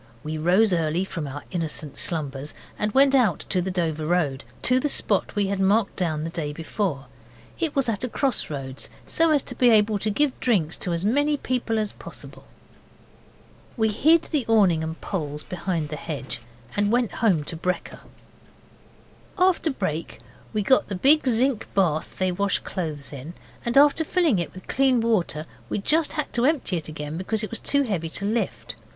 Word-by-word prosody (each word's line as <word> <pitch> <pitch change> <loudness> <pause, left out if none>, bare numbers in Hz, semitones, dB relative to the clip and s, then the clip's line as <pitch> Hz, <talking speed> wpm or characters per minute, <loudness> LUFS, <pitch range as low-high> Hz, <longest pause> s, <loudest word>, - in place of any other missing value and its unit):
We 155 +1 -4
rose 185 +6 +4
early 165 +1 +1
from 165 -6 -5
our 145 +2 -7
innocent 160 -4 -3
slumbers, 145 -3 -2 0.2
and 210 0 0
went 270 +3 +5
out 230 - +3
to 185 - +2
the 185 - -2
Dover 160 -4 -1
Road 155 -6 0 0.2
to 255 +1 +3
the 295 - 0
spot 205 -7 +1
we 205 -1 +2
had 195 0 -2
marked 200 +2 +2
down 155 -4 -1
the 165 - -4
day 150 -3 -3
before. 160 -2 -3 0.5
It 325 -3 -1
was 275 -2 +2
at 220 -2 -1
a 250 - -1
cross 265 0 0
roads, 135 -3 -6 0.2
so 330 0 +2
as 295 -3 +3
to - - -6
be 245 - +4
able 210 -2 +4
to 215 - -1
give 275 +6 0
drinks 180 -10 +1
to 180 - -1
as 170 +3 -2
many 290 +6 +2
people 245 -4 -1
as 215 -2 -1
possible. - - -11 1.3
We 220 -1 +2
hid 315 +10 +4
the 295 -5 -1
awning 195 -8 +4
and 160 +1 -5
poles 150 -6 -4
behind 170 -4 -3
the 150 - -5
hedge 140 -6 -5 0.3
and 205 0 +1
went 240 -4 +2
home 185 -10 +3
to 165 - -6
brekker. 180 +3 -3 1.4
After 365 -3 +3
brek 175 - -3 0.3
we 215 -2 -1
got 260 +6 +3
the 200 - -3
big 280 +9 +5
zinc 250 0 +2
bath 165 -6 +1
they 185 -1 +1
wash 200 +2 +1
clothes 155 -6 -5
in, 145 +6 -8 0.3
and 235 +2 0
after 290 +3 +6
filling 320 - +2
it 170 - -3
with 185 - -12
clean 265 -2 +3
water 205 -9 0 0.2
we - - -1
just 305 +10 +1
had 300 -2 -3
to 240 +1 +2
empty 290 - +1
it 160 -1 -6
again 150 0 -5
because 210 +4 -1
it 215 - -4
was 230 - -2
too 280 0 +2
heavy 185 -10 -2
to 200 - -4
lift. 225 +3 -2
195 Hz, 190 wpm, -24 LUFS, 160-245 Hz, 1.4 s, after